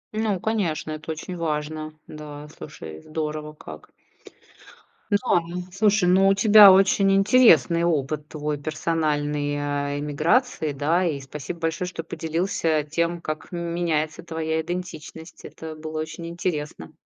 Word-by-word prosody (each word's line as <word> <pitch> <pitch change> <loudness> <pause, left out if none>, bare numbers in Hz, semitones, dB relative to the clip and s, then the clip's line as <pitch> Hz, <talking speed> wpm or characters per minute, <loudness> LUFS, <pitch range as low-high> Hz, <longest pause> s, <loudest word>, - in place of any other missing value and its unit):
Ну, 215 -3 0
конечно, 180 -8 -1
это 155 +1 -5
очень 160 +3 -6
важно, 155 -1 -3
да, 150 -1 -9
слушай, 80 - -9
здорово 155 - -4
как. 80 - -11 1.2
Да, 205 - +3 0.2
м, 175 +2 -6
слушай, 205 -1 +3
ну, 190 +2 +5
у 195 - +5
тебя 205 0 +9
очень 195 +1 +4
интересный 195 - +5
опыт 150 -2 -1
твой, 150 -1 -3
персональной, 150 -1 -1
э, 145 0 -2
иммиграции, 155 - +1
да, 150 +6 +1
и 155 -4 -1
спасибо 145 +4 -7
большое, 165 +2 -2
что 180 - -6
поделился 165 -1 -1
тем, 170 +3 -2
как 155 +1 -5
меняется 170 -3 -2
твоя 160 -1 -2
идентичность. 160 -1 -7
Это 160 -1 -9
было 155 0 -6
очень 155 +2 -6
интересно. 150 - -4
160 Hz, 130 wpm, -24 LUFS, 150-175 Hz, 1.2 s, тебя